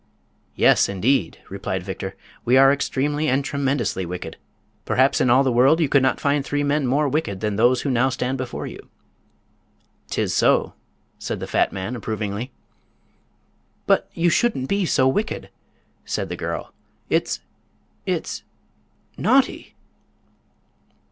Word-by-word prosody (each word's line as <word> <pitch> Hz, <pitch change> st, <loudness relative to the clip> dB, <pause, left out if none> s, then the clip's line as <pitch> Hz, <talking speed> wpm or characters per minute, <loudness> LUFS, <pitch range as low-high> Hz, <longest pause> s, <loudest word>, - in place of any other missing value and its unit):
"Yes, -, -, +4 dB
indeed," 100 Hz, 0 st, +1 dB
replied 95 Hz, -1 st, -4 dB
Victor. 95 Hz, 0 st, -6 dB, 0.3 s
"We 125 Hz, +2 st, +4 dB
are 135 Hz, +1 st, +7 dB
extremely 145 Hz, +2 st, -1 dB
and 135 Hz, +1 st, +1 dB
tremendously 135 Hz, -9 st, -1 dB
wicked. 90 Hz, -2 st, -6 dB, 0.5 s
Perhaps 130 Hz, +2 st, +2 dB
in 125 Hz, -, +3 dB
all 130 Hz, +3 st, +5 dB
the 130 Hz, -, +1 dB
world 130 Hz, +7 st, +4 dB
you 160 Hz, -, +3 dB
could 140 Hz, 0 st, +4 dB
not 130 Hz, -, +1 dB
find 145 Hz, 0 st, +1 dB
three 145 Hz, +1 st, -1 dB
men 145 Hz, -1 st, +1 dB
more 145 Hz, +4 st, +2 dB
wicked 135 Hz, -9 st, -1 dB
than 105 Hz, -1 st, -1 dB
those 120 Hz, +4 st, +3 dB
who 140 Hz, -, -1 dB
now 125 Hz, +1 st, +2 dB
stand 130 Hz, 0 st, -2 dB
before 130 Hz, -1 st, -4 dB
you." -, -, -10 dB, 1.2 s
"'Tis -, -, -1 dB
so," -, -, +3 dB, 0.5 s
said -, -, -4 dB
the -, -, -4 dB
fat -, -, +1 dB
man, 100 Hz, +6 st, -4 dB
approvingly. 110 Hz, +1 st, -4 dB, 1.4 s
"But -, -, +2 dB
you 170 Hz, +1 st, +2 dB
shouldn't 185 Hz, -, +1 dB
be 200 Hz, 0 st, 0 dB
so 130 Hz, -4 st, +3 dB
wicked," 210 Hz, -, -2 dB, 0.5 s
said -, -, -3 dB
the -, -, -3 dB
girl; -, -, -5 dB, 0.4 s
"it's—it's—naughty!" 265 Hz, 0 st, -3 dB
130 Hz, 135 wpm, -22 LUFS, 110-145 Hz, 1.4 s, are